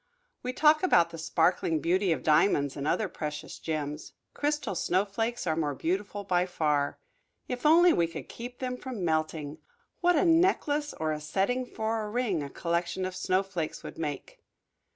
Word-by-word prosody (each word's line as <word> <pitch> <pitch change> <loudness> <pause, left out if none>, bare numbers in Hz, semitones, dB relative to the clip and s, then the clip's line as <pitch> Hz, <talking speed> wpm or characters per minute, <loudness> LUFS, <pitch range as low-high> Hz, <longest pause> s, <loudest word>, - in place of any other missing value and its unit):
We 250 - -3
talk 305 +4 +4
about 180 - +4
the 165 - -8
sparkling 165 0 +1
beauty 185 +3 +1
of 160 - -1
diamonds 150 -3 +3
and 140 0 -3
other 195 +6 +1
precious 150 -3 -6
gems; 150 -1 -4 0.2
crystal 295 -5 -1
snowflakes 205 +7 -1
are 160 -2 +1
more 150 -3 -1
beautiful 200 +6 -2
by 180 -2 +1
far. 150 -5 0 0.5
If 250 +4 -1
only 340 +2 +7
we 170 - +2
could 165 - -8
keep 245 +1 -8
them 250 -1 -3
from 250 -9 -5
melting 155 -2 -1 0.4
what 355 0 +3
a 305 - +3
necklace 325 -4 +2
or 155 -1 -1
a 150 0 -3
setting 200 +11 0
for 220 -1 -2
a 210 - -4
ring 215 -7 0
a 140 - -5
collection 170 +4 -2
of 185 0 -4
snowflakes 185 -3 -1
would - - -9
make! 150 -4 -5
185 Hz, 170 wpm, -29 LUFS, 160-245 Hz, 0.5 s, only